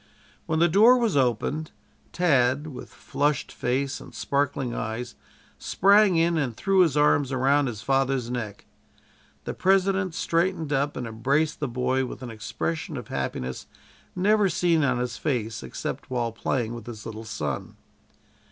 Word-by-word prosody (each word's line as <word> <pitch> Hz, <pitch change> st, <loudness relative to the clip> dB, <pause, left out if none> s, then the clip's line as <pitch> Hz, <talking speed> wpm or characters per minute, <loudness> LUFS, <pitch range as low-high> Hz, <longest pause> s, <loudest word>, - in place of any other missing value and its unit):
When 160 Hz, -, 0 dB
the 170 Hz, +2 st, +5 dB
door 220 Hz, +9 st, +6 dB
was 230 Hz, -7 st, +1 dB
opened, 135 Hz, +4 st, 0 dB, 0.4 s
Tad, 140 Hz, -5 st, +2 dB
with 145 Hz, -5 st, -8 dB
flushed 145 Hz, -1 st, -1 dB
face 130 Hz, +2 st, -2 dB
and -, -, -13 dB
sparkling 140 Hz, -3 st, -1 dB
eyes, 115 Hz, +2 st, -4 dB, 0.5 s
sprang 200 Hz, 0 st, +4 dB
in 165 Hz, 0 st, +2 dB
and 125 Hz, -6 st, -2 dB
threw 195 Hz, -1 st, +2 dB
his 165 Hz, -6 st, +4 dB
arms 145 Hz, -2 st, +3 dB
around 135 Hz, +2 st, +2 dB
his 110 Hz, -4 st, -6 dB
father's 135 Hz, -2 st, +1 dB
neck. 110 Hz, -5 st, -5 dB, 0.8 s
The -, -, -4 dB
President 190 Hz, -1 st, +2 dB
straightened 165 Hz, -3 st, 0 dB
up 145 Hz, +1 st, 0 dB
and 125 Hz, -, -3 dB
embraced 135 Hz, +8 st, 0 dB
the 150 Hz, -, -1 dB
boy 130 Hz, +2 st, 0 dB
with 125 Hz, -, -8 dB
an 120 Hz, -, -6 dB
expression 85 Hz, -7 st, -4 dB
of -, -, -8 dB
happiness 65 Hz, 0 st, -4 dB, 0.5 s
never 205 Hz, +2 st, +3 dB
seen 170 Hz, -2 st, +2 dB
on 130 Hz, -3 st, +2 dB
his 120 Hz, -1 st, -3 dB
face 115 Hz, -7 st, -2 dB
except 65 Hz, -, -6 dB
while 120 Hz, -2 st, -1 dB
playing 115 Hz, 0 st, -2 dB
with 120 Hz, 0 st, -9 dB
his 110 Hz, -3 st, -8 dB
little 110 Hz, 0 st, -7 dB
son. 75 Hz, -, -4 dB
135 Hz, 150 wpm, -25 LUFS, 120-165 Hz, 0.8 s, door